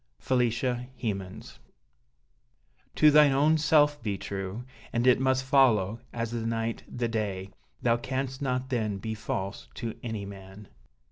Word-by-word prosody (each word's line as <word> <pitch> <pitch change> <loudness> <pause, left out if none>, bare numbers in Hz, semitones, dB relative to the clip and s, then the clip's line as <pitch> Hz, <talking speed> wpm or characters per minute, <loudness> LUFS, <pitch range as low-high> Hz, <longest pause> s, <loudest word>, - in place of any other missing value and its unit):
Felicia 125 0 0
Hemans 95 -5 -5 1.4
To 150 - +6
thine 150 -2 +6
own 155 +3 +3
self 150 -1 +4
be 105 -3 -2
true; 95 +4 -5 0.3
And 120 +1 0
it 125 -1 +5
must 130 0 +2
follow, 120 -6 +3
as 115 -1 -3
the 120 -1 -3
night 115 0 -2
the 120 -1 -2
day, 100 -4 -3 0.3
Thou 115 0 +3
canst 130 +2 -3
not 130 -1 -2
then 110 -5 0
be 110 +3 -4
false 100 -8 -4
to 115 -1 -4
any 110 -5 -4
man. 100 +1 -11
115 Hz, 140 wpm, -28 LUFS, 105-130 Hz, 1.4 s, To